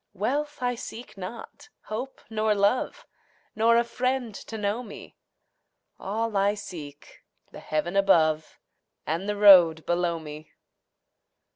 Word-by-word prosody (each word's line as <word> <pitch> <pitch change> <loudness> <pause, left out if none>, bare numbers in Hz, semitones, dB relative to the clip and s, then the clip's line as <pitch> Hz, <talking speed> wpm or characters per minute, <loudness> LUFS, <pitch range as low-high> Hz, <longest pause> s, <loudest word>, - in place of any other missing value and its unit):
Wealth 285 +7 -2
I 245 0 +1
seek 235 0 -9
not, 195 +4 -9
hope 245 +5 -6
nor 215 -1 0
love, 225 - 0 0.5
Nor 230 +2 +4
a 235 - +4
friend 250 -1 -2
to 220 +3 -8
know 210 +3 -1
me; 225 -4 -11 0.8
All 220 +2 -3
I 200 +1 +2
seek, 165 -8 -10 0.3
the - - -10
heaven 160 +4 -2
above 160 -6 +2 0.5
And 170 +6 -2
the 205 - -1
road 180 -6 +7
below 175 -1 0
me. 155 -1 -10
205 Hz, 125 wpm, -26 LUFS, 175-230 Hz, 0.8 s, road